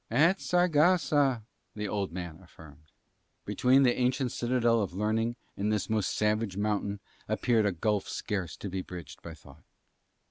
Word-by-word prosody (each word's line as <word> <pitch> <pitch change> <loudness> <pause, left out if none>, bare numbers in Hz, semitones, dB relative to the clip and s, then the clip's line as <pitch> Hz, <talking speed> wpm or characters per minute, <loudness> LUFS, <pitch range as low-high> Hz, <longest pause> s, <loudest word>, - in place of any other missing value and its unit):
"At 160 +11 +3
Saragossa," 155 -7 +3 0.3
the 105 0 -3
old 100 -3 -2
man 85 -2 -6
affirmed. 80 -4 -16 0.6
Between 130 +2 +3
that 125 -1 +2
ancient 125 0 +1
citadel 120 -2 +1
of 95 -3 -4
learning 110 +3 0 0.2
and 105 +2 -1
this 105 0 -1
most 110 -4 0
savage 105 -2 0
mountain 105 -1 -1 0.3
appeared 110 0 +2
a - - +1
gulf 100 +3 -1
scarce 95 -6 -3
to - - -6
be 95 0 -3
bridged 85 -6 -9
by 80 -2 -9
thought. 70 -1 -17
105 Hz, 150 wpm, -29 LUFS, 95-125 Hz, 0.6 s, At